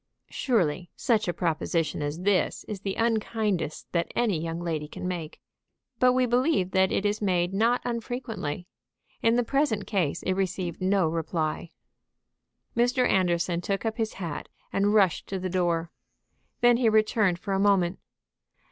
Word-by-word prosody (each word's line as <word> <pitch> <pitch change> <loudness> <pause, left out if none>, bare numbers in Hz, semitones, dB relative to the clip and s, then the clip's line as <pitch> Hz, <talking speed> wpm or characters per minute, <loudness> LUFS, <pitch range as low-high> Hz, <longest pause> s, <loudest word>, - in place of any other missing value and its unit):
Surely 180 - 0
such 220 -4 +1
a - - +2
proposition 165 -2 -1
as 145 +3 -3
this 195 0 +1
is 210 -3 -6
the 195 -1 -3
unkindest 220 -6 -1
that 170 -1 -1
any 210 -10 +1
young 165 0 -3
lady 160 -3 -3
can 180 - -6
make; 170 -3 -5 0.6
but 250 -1 +5
we 255 0 +3
believe 245 - +2
that 190 0 +3
it 200 - 0
is 205 +1 0
made 180 -2 +1
not 230 +5 +2
unfrequently. 235 - -4 0.6
In 230 +1 +3
the 245 - +3
present 240 -5 0
case 180 -9 -1
it 185 - +1
received 185 -2 -2
no 190 -2 +3
reply. 160 0 -2 1.1
Mr. 245 +2 +3
Anderson 175 -2 +1
took 195 +4 -2
up 220 0 -1
his 220 -2 -1
hat 170 -6 -5 0.2
and 205 +2 +2
rushed 195 -6 +3
to 195 - -3
the 185 0 -3
door. 170 -2 0 0.7
Then 240 -1 +6
he 240 -2 +3
returned 215 -4 +3
for 195 +2 -4
a 195 - +1
moment. 195 -3 +2
195 Hz, 155 wpm, -27 LUFS, 175-225 Hz, 1.1 s, Then